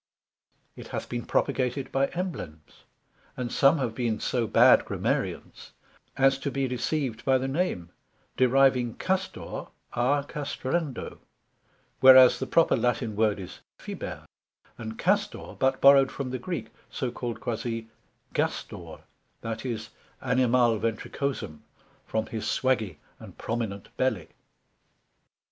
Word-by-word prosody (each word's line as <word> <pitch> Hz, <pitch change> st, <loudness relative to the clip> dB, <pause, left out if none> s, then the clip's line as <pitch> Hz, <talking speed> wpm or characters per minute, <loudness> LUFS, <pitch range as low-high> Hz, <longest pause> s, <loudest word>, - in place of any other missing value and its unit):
it -, -, -10 dB
hath -, -, -5 dB
been 120 Hz, -1 st, -4 dB
propagated 135 Hz, -1 st, 0 dB
by 135 Hz, 0 st, +2 dB
Emblems: 135 Hz, -, -7 dB, 0.5 s
and 125 Hz, -1 st, -3 dB
some 140 Hz, +3 st, +4 dB
have 125 Hz, -5 st, -2 dB
been 115 Hz, -2 st, -1 dB
so 120 Hz, -3 st, -1 dB
bad -, -, +6 dB
Grammarians -, -, -3 dB, 0.4 s
as 135 Hz, 0 st, +4 dB
to 140 Hz, -, -2 dB
be 135 Hz, -1 st, -1 dB
deceived 125 Hz, -2 st, -2 dB
by 130 Hz, -1 st, +4 dB
the 130 Hz, +1 st, -2 dB
Name, 135 Hz, -, -2 dB, 0.4 s
deriving 130 Hz, -2 st, +3 dB
Castor 190 Hz, 0 st, -3 dB, 0.3 s
à 140 Hz, +4 st, +1 dB
castrando, 145 Hz, -1 st, -3 dB, 0.8 s
whereas 130 Hz, 0 st, +8 dB
the 130 Hz, -, -3 dB
proper 165 Hz, 0 st, +4 dB
Latine 120 Hz, -3 st, 0 dB
word 105 Hz, -1 st, +2 dB
is 90 Hz, -, -9 dB, 0.2 s
Fiber, -, -, -7 dB, 0.5 s
and 110 Hz, -1 st, -7 dB
Castor 200 Hz, -, -1 dB
but 130 Hz, 0 st, +2 dB
borrowed 135 Hz, -1 st, +7 dB
from 135 Hz, -2 st, -5 dB
the 130 Hz, -, -3 dB
Greek, 175 Hz, +6 st, -4 dB, 0.2 s
so 130 Hz, -3 st, -3 dB
called 120 Hz, -2 st, -5 dB
quasi 115 Hz, -1 st, -3 dB, 0.5 s
γάστωρ, -, -, -3 dB, 0.4 s
that 115 Hz, 0 st, -4 dB
is, 115 Hz, -4 st, -4 dB, 0.3 s
Animal 125 Hz, -3 st, +2 dB
ventricosum, 115 Hz, -, -3 dB, 0.5 s
from 110 Hz, 0 st, -1 dB
his 110 Hz, -1 st, -5 dB
swaggy 115 Hz, -, 0 dB, 0.2 s
and -, -, -12 dB
prominent 110 Hz, -4 st, -4 dB
belly. 115 Hz, -11 st, 0 dB
125 Hz, 120 wpm, -27 LUFS, 115-135 Hz, 0.8 s, whereas